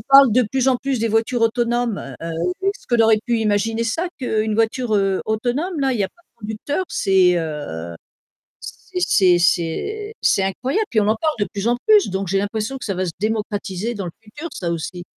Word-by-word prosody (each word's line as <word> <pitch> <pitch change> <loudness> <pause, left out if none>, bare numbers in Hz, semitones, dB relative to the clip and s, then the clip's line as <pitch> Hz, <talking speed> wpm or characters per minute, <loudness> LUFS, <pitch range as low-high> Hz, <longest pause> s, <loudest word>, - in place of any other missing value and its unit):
parle 275 -4 +8
de 255 - +4
plus 260 +3 -1
en 260 - +3
plus 270 0 -2
des 230 - 0
voitures 225 +2 +1
autonomes, 235 -1 +1 0.2
heu, 165 0 -4 0.4
ce - - -23
qu'on 240 -2 +3
aurait 220 -1 +5
pu 240 -2 +1
imaginer 220 +1 0
ça 330 +11 -1
qu'une 220 -4 0
voiture, 225 +1 +1
heu, 195 -1 +1
autonome 250 - -1
là, 270 -1 +2
il 245 - -2
y - - +3
a - - -3
pas 345 - -29
de 235 - -43
conducteur, 220 - -3
c'est, 185 -2 +3
heu, 145 - -5 0.7
c'est 180 - -7
c'est 180 0 +4
c'est 295 - 0
c'est 195 - +3
incroyable, 260 - -1
puis 220 - +3
on 205 - +1
en 220 - +3
parle 310 +6 0
de 205 - +1
plus 200 +1 -3
en 240 +1 +3
plus, 420 - +5
donc 190 0 -2
j'ai 195 +2 +1
l'impression 215 +5 -2
que - - -8
ça 200 - -2
va 185 +1 -1
se 170 - -3
démocratiser 210 0 -2
dans 200 -3 -4
le 170 - -6
futur 290 +10 -8
ça, 170 -2 -3
aussi. 175 +2 -4
220 Hz, 215 wpm, -21 LUFS, 195-250 Hz, 0.7 s, parle